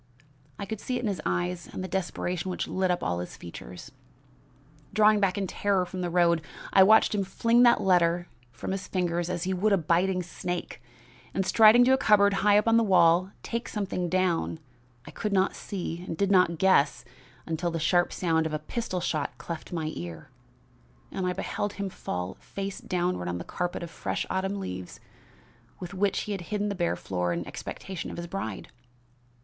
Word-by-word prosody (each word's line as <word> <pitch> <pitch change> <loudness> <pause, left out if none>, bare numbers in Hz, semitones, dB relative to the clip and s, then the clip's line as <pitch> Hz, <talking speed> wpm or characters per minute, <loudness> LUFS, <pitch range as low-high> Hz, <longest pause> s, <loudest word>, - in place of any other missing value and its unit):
I - - -4
could 220 +1 -5
see 255 - -2
it - - -3
in - - 0
his 195 -6 -2
eyes 175 -1 -2
and 185 - -5
the - - -3
desperation 180 -1 -2
which 180 - -3
lit 190 0 0
up 180 - 0
all 85 0 -1
his 90 - -7
features. 85 -8 -10 1.0
"Drawing 215 0 +5
back 195 -1 +1
in 200 - 0
terror 195 0 0
from 185 +1 -6
the 175 - -1
road, 170 -1 +3 0.3
I 195 - +7
watched 220 +4 +6
him 205 -2 +1
fling 230 +5 +2
that 240 -1 +6
letter 175 -2 +3 0.3
of - - -28
from - - -4
his 190 -1 -4
fingers 175 -2 -1
as 175 -2 -2
he 190 0 -1
would 200 +4 +1
a - - +5
biting 180 +2 +1
snake, 175 -4 -5 0.5
and, 190 - +1
striding 225 +4 +7
to 260 +2 +5
a 265 - +3
cupboard 200 -1 +5
high 205 +1 +5
up 210 - +2
on 230 0 +5
the 230 - +4
wall, 180 -2 +4
take 235 +1 -3
down - - -8
something 185 -4 -1 0.5
I - - -10
could 210 -2 -3
not 190 0 +2
see 175 -3 -5
and 165 - -4
did 200 -1 +1
not 180 -3 +4
guess 155 -8 +3 0.4
at 160 -2 -3
till 175 0 0
the 165 - -3
sharp 175 +3 +2
sound 160 -3 +1
of 155 - -6
a - - +1
pistol 180 +4 -4
shot 155 -4 -2
cleft 165 -2 -7
my 160 -3 -2
ear, 85 -2 -8 0.8
and 185 -1 -2
I 180 - 0
beheld 205 +2 -3
him 200 -1 -4
fall 90 - -5
face 195 0 -6
downward 180 - -1
on 90 0 -2
the 85 - -5
carpet 175 -1 -3
of 170 - -7
fresh - - -3
autumn 195 +1 -1
leaves 90 - -6 0.8
with 180 +1 -7
which 195 0 +1
he 210 - -5
had 195 -3 -3
hidden 210 +3 -2
the - - -1
bare 175 -3 0
floor 90 -2 -2
in 85 0 -2
expectation 190 -2 -6
of - - -7
his 170 - -4
bride. 170 - -5
180 Hz, 200 wpm, -27 LUFS, 170-200 Hz, 1.0 s, I